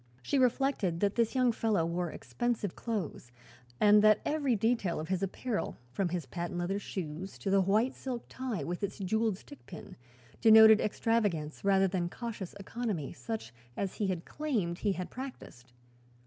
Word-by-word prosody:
She 275 - +1
reflected 250 -8 +1
that 200 -1 +2
this 235 +1 +1
young 255 -2 +4
fellow 215 -7 +1
wore 170 +1 -2
expensive 235 0 -3
clothes 195 - -4 0.5
and 210 0 +6
that 215 0 +6
every 285 -5 +1
detail 220 -5 0
of 155 - -5
his 190 -1 0
apparel, 210 +4 -3
from 195 +7 0
the 175 -1 -3
patent 175 0 -4
leather 180 +3 -1
shoes 185 -1 -6
to 195 - -3
the 195 0 +5
white 215 +7 +2
silk 250 -3 -5
tie 250 - -4
with 175 +4 -4
its 200 - -3
jeweled 215 +1 0
stick 285 +7 -14
pin, 170 - -10 0.5
denoted 220 -1 +8
extravagance 205 -9 0
rather 195 -1 +4
than 175 -2 -1
cautious 215 -4 -6
economy, 200 - -3
such 115 -5 -6 0.2
as 195 -2 -3
he 205 - 0
had 180 -3 -3
claimed 220 - -2
he 205 -2 +1
had 180 -1 -5
practiced. 245 - -9
200 Hz, 165 wpm, -31 LUFS, 175-230 Hz, 0.5 s, denoted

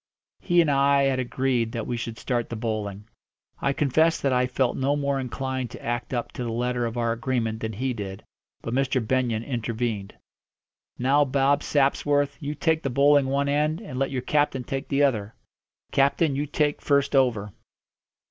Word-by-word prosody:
He 175 0 +3
and 155 -3 +2
I 140 0 +4
had 135 -1 +1
agreed 125 -2 0
that 115 -2 -3
we 120 - -2
should 115 -1 -5
start 120 -2 -2
the 115 - -4
bowling. 105 -2 -4 0.5
I 140 - +2
confess 155 +4 +2
that 135 -2 +1
I 125 0 +2
felt 125 -1 0
no 135 +2 +1
more 140 -1 0
inclined 130 -1 -3
to - - -11
act 120 +1 -2
up 120 -2 -2
to 125 - -5
the 115 - -3
letter 120 +1 -1
of 115 +1 -6
our 115 -1 +1
agreement 115 -2 -1
than 110 0 -4
he 130 +5 -2
did. 100 -2 -6 0.4
But 115 - -4
Mr. 135 0 +1
Benyon 120 -3 0
intervened. 115 -4 -3 0.8
"Now, 135 +4 +3
Bob 140 +1 +2
Sapsworth, 145 0 +1
you 150 -1 -4
take 160 0 +1
the 135 - -2
bowling 140 +2 +4
one 140 +1 0
end, 150 +3 +1
and 160 - -6
let 135 - +1
your 130 -2 -3
captain 145 -2 +1
take 135 +2 -4
the 140 +1 +2
other. 110 -6 0 0.6
Captain, 140 +2 +2
you 145 +2 -1
take 145 0 0
first 140 -1 +2
over." 115 -7 +2
130 Hz, 185 wpm, -25 LUFS, 120-140 Hz, 0.8 s, I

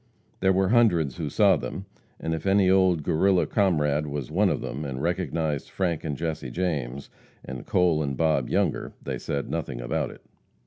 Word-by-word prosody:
There 95 0 +3
were 95 0 +2
hundreds 90 - +3
who 75 -3 -3
saw 95 +3 +4
them, 95 +6 -6 0.3
and 80 - -2
if 80 +3 -4
any 95 -1 +4
old 95 -4 +3
Guerrilla 95 +5 +3
comrade 75 -7 +1
was 70 -3 -4
one - - +3
of - - 0
them, 70 +3 -5
and 65 -3 -4
recognized 80 -3 -1
Frank 85 -5 -1
and 75 -4 -3
Jesse 80 -5 -3
James, 70 -5 -3 0.3
and 65 -1 -7
Cole 85 -4 +3
and 70 -3 -2
Bob 80 -6 +1
Younger, - - 0
they - - -4
said 70 -1 -3
nothing - - -3
about - - -2
it. - - -13
80 Hz, 180 wpm, -26 LUFS, 70-95 Hz, 0.3 s, saw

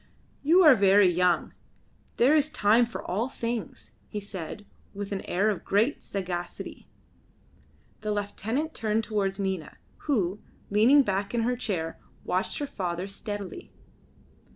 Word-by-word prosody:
"You 335 +6 +5
are 305 -4 +9
very 200 -3 +5
young; 180 0 +2 0.6
there 265 +6 +5
is 300 0 +3
time 230 -2 +3
for 230 - -7
all 220 +8 -1
things," 235 -3 -4 0.2
he 210 - -4
said, 200 0 -7 0.3
with 200 0 -5
an 195 - -2
air 200 +4 +2
of 200 - -5
great 220 +8 +1
sagacity. 175 -3 -5 1.1
The 215 -1 -3
lieutenant 220 +9 -2
turned 220 0 0
towards 200 -3 -1
Nina, 190 -4 -3 0.3
who, 210 - 0 0.3
leaning 240 +8 +6
back 200 +1 -2
in 230 - +1
her 245 +2 +1
chair, 180 -9 -3 0.3
watched 185 +1 -1
her 290 - -2
father 180 -8 -3
steadily. 205 - -6
205 Hz, 135 wpm, -27 LUFS, 190-235 Hz, 1.1 s, are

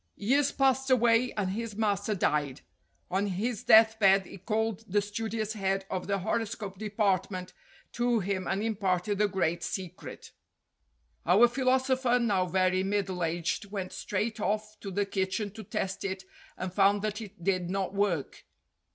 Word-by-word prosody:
Years 275 +7 +2
passed 265 0 +2
away 240 -1 +4
and 195 -3 -1
his 225 +1 -4
master 210 -1 0
died. 145 -6 0 0.5
On 195 +3 +1
his 205 +4 -2
death 220 0 +6
bed 195 -2 +5
he 195 - -11
called 220 +1 -1
the 205 - +4
studious 215 +1 -3
head 195 -2 -1
of 185 -1 -3
the 200 0 +1
horoscope 205 -1 -3
department 200 -3 -1 0.4
to 240 -1 +1
him 190 -1 -2
and 195 +2 -1
imparted 200 -2 0
the 210 - +4
great 175 -3 -1
secret. 185 -1 -6 0.9
Our 195 +8 +6
philosopher, 260 0 +2
now 200 -7 +1
very 185 +1 +2
middle 195 -2 -1
aged, 170 +4 -1
went 195 -2 -5
straight 215 +3 -2
off 215 +1 -2
to 200 - -6
the 200 +2 0
kitchen 195 +1 -2
to 220 +2 -9
test 190 0 -3
it 190 -1 -4 0.3
and 185 -1 -4
found 200 +1 +3
that 215 +1 -2
it 205 -4 -11
did 185 -2 0
not 190 0 -2
work. 195 -8 -1
200 Hz, 155 wpm, -29 LUFS, 190-220 Hz, 0.9 s, death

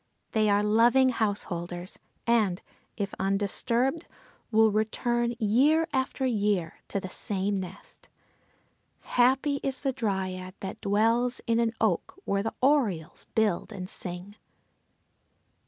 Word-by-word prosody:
They 215 -1 +2
are 205 0 +3
loving 235 +5 +5
house 220 -4 0
holders, 175 0 -6 0.3
and, 215 -6 +2 0.4
if 200 -2 -3
undisturbed, 230 - 0 0.4
will 220 0 +5
return, 235 +3 0
year 270 +9 +3
after 265 0 -1
year, 205 -8 0
to 200 - -2
the 190 - -6
same 200 +2 -1
nest. 190 0 -8 0.9
Happy 265 +3 +2
is 270 -1 -1
the 270 -2 +1
Dryad 190 -5 -3
that 190 0 -6
dwells 230 +5 +2
in 230 0 +2
an 230 -1 +1
oak 220 - 0
where 200 0 +1
the 225 +2 -3
orioles 220 - +1
build 220 -3 +1
and 185 -3 -6
sing! 180 +3 -7
215 Hz, 120 wpm, -28 LUFS, 195-240 Hz, 0.9 s, loving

